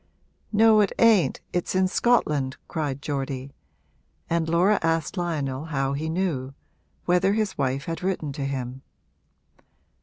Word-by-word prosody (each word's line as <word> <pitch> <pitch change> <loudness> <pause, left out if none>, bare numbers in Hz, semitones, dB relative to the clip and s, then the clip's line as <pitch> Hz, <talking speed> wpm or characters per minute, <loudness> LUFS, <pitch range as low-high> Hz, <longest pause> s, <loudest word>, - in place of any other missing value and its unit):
'No, 220 0 +5
it 200 - +2
ain't 225 -6 +4
it's 175 +1 -1
in 185 0 +3
Scotland!' 150 - +1
cried 145 -4 -3
Geordie; 135 -2 -3 0.8
and 165 -1 +1
Laura 180 +5 +3
asked 165 +1 0
Lionel 150 -6 -2
how 135 -3 -1
he 155 +3 -3
knew 155 -7 -2 0.5
whether 180 +2 +3
his 215 -2 -1
wife 135 0 -1
had 165 0 -4
written 180 -6 -2
to 140 -1 -4
him. 130 -1 -4
160 Hz, 130 wpm, -25 LUFS, 135-185 Hz, 0.8 s, No